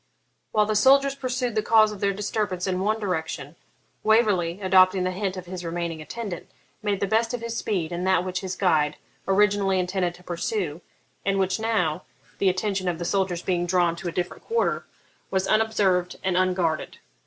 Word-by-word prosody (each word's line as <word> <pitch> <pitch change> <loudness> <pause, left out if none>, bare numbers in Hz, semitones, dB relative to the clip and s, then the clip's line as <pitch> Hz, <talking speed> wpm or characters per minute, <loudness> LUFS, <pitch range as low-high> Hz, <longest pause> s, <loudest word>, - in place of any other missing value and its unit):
While 210 -1 +3
the 215 0 -1
soldiers 275 +5 +5
pursued 255 -3 -2
the 215 - +1
cause 215 0 +5
of 210 - -8
their 200 0 +2
disturbance 205 -2 -2
in 185 -1 -1
one 215 +3 0
direction, 160 -6 -3 0.5
Waverley, 205 -6 +2
adopting 185 -1 +4
the 185 - 0
hint 190 0 -3
of 185 - -6
his 180 0 -7
remaining 170 -1 -3
attendant, 200 +1 -6 0.3
made 205 -2 -1
the - - +3
best 225 +4 +1
of 240 - -7
his 235 0 -4
speed 180 -8 -2
in 175 +1 -3
that 185 -1 +2
which 185 0 -2
his 190 -1 -4
guide 155 -6 +2 0.3
originally 200 -1 +3
intended 180 -1 -1
to 180 - -17
pursue, 175 -2 -3 0.4
and 195 0 +1
which 190 +2 +1
now 200 -9 0 0.4
(the 195 - +4
attention 190 0 -1
of 170 - -2
the 175 - -4
soldiers 185 -2 0
being 175 -2 0
drawn 175 -2 +2
to 185 - -6
a - - -1
different 175 +1 -4
quarter) 465 +1 0 0.4
was 190 0 0
unobserved 195 -5 +2
and 185 -1 0
unguarded. 180 -3 0
190 Hz, 185 wpm, -25 LUFS, 180-210 Hz, 0.5 s, soldiers